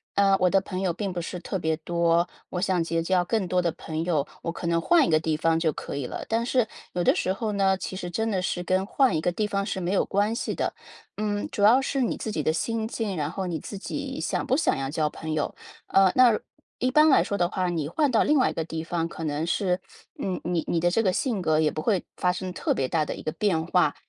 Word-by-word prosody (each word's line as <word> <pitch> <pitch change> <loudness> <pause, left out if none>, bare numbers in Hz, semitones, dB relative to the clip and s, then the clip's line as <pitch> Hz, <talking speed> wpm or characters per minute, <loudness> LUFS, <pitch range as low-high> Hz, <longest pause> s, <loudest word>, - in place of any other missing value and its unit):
“呃， 195 -1 +4
我 180 - +4
的 195 +1 +3
朋 185 -1 -5
友 185 -2 0
并 195 +2 -3
不 175 -1 -3
是 175 +1 -6
特 190 - -3
别 160 -1 0
多， 170 +1 +1 0.2
我 180 - -2
想 185 -2 +1
结 165 0 -1
交 180 +1 +2
更 215 +1 0
多 180 0 +2
的 175 - +1
朋 160 0 -4
友， 155 -5 +1 0.2
我 - - -2
可 175 - -7
能 170 0 +2
换 325 - +4
一 - - -1
个 155 - +4
地 160 0 0
方 165 +1 +2
就 160 -2 +1
可 140 - -6
以 140 - -3
了。” - - -5
但 230 +1 +1
是， 250 -1 +2 0.3
有 175 - 0
的 - - +5
时 185 - 0
候 215 +1 -2
呢， 195 -1 +2
其 185 - -5
实 180 -2 -5
真 225 +5 -1
的 190 -3 0
是 180 -1 -2
跟 185 +2 +1
换 255 -1 +2
一 - - 0
个 160 - +1
地 210 +4 0
方 200 -1 -1
是 190 - -3
没 175 +1 -1
有 200 - +2
关 205 +3 +1
系 230 - -3
的。 - - -1 0.4
嗯， 205 -1 -2
主 205 - -1
要 235 +6 +7
是 275 0 -1
你 240 - 0
自 220 - -4
己 160 - -1
的 155 +2 +1
心 225 +6 -1
境， 220 -5 -3
然 150 -1 -1
后 190 +3 -4
你 170 -3 -3
自 200 - -7
己 270 +6 -5
想 - - -2
不 260 - +3
想 320 - +1
要 135 0 -3
交 155 +1 0
朋 160 +1 -5
友。 150 -2 -1 0.3
呃， 195 -1 +5
那 245 -4 +6 0.4
一 255 +1 +1
般 305 +3 +6
来 275 - +6
说 200 - -2
的 175 -2 +1
话， 185 -1 -1
你 160 -4 -2
换 295 - +1
到 235 - +3
另 300 - +3
外 255 - +3
一 - - -4
个 165 - -2
地 160 0 -5
方， 165 0 -1
可 165 - -6
能 150 +1 -1
是， 180 +1 0 0.4
嗯， 185 -2 -2
你 175 -1 0
你 170 - +1
的 175 +1 +3
这 225 +6 +1
个 190 - +3
性 220 0 -1
格 155 -2 +2
也 155 -1 +3
不 155 - -4
会 195 0 +1
发 180 - +1
生 185 0 -5
特 - - 0
别 135 - -1
大 155 +3 +1
的 - - -4
一 - - -9
个 155 - -2
变 170 -6 0
化。 175 -4 +2
180 Hz, 295 characters per minute, -26 LUFS, 165-210 Hz, 0.4 s, 要